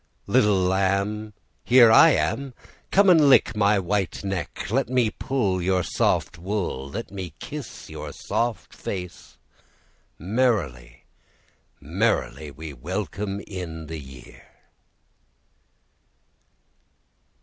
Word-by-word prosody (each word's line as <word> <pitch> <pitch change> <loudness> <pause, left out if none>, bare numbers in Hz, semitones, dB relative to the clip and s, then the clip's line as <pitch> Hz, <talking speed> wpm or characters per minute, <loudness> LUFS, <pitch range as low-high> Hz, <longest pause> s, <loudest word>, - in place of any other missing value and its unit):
Little 105 -2 +3
lamb, 100 +3 0 0.3
Here 120 -2 +7
I 155 +7 +8
am; 135 -3 -1 0.3
Come 200 +1 +4
and 160 -6 +6
lick 130 - +5
My 105 0 +3
white 95 0 -1
neck; 95 0 -4
Let 130 +1 +1
me 125 -4 +2
pull 100 -9 -1
Your 90 0 +1
soft 85 - 0
wool; 90 -8 -3
Let 110 +8 -6
me 95 -5 -6
kiss 145 - -8
Your - - -7
soft 115 -3 -3
face; 90 -1 -7 0.8
Merrily, 90 - -1 0.8
merrily 65 +4 -1
we 75 +1 -9
welcome 100 +7 -4
in 85 -5 -7
the 80 0 -6
year. 65 -3 -13
100 Hz, 105 wpm, -24 LUFS, 85-115 Hz, 0.8 s, I